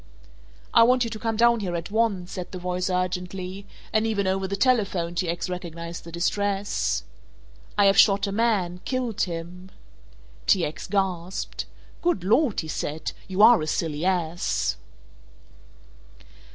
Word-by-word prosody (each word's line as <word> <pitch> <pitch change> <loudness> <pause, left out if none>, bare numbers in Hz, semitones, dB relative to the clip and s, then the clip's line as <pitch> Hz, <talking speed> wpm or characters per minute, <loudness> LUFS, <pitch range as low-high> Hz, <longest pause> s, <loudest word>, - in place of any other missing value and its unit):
"I 230 - +7
want 250 +2 +5
you 230 - -3
to 215 - -5
come 225 -1 -2
down 235 0 +5
here 180 -4 -3
at 170 +3 -5
once," 210 -5 0
said 180 -1 -6
the 185 - -5
voice 180 +1 -2
urgently, 185 +1 -3 0.3
and 220 +1 +2
even 205 -3 0
over 190 0 0
the 200 - -2
telephone 200 -7 +1
T. 175 0 -1
X. 170 +2 -2
recognized 170 -2 -6
the 170 - -9
distress. 200 +3 0 0.7
"I 205 - +5
have 195 0 +5
shot 200 0 +5
a 200 - -3
man, 200 -5 +1
killed 250 -5 -2
him!" 180 +1 -4 0.8
T. 185 -4 +4
X. 155 +3 -6
gasped. 190 -2 -2 0.4
"Good 345 - +1
Lord," 230 +5 +2
he 160 - -8
said, 155 0 -3 0.2
"you 195 +2 +2
are 235 -3 +8
a 155 - -3
silly 155 -1 -1
ass!" 175 -2 0
190 Hz, 150 wpm, -25 LUFS, 175-210 Hz, 0.8 s, are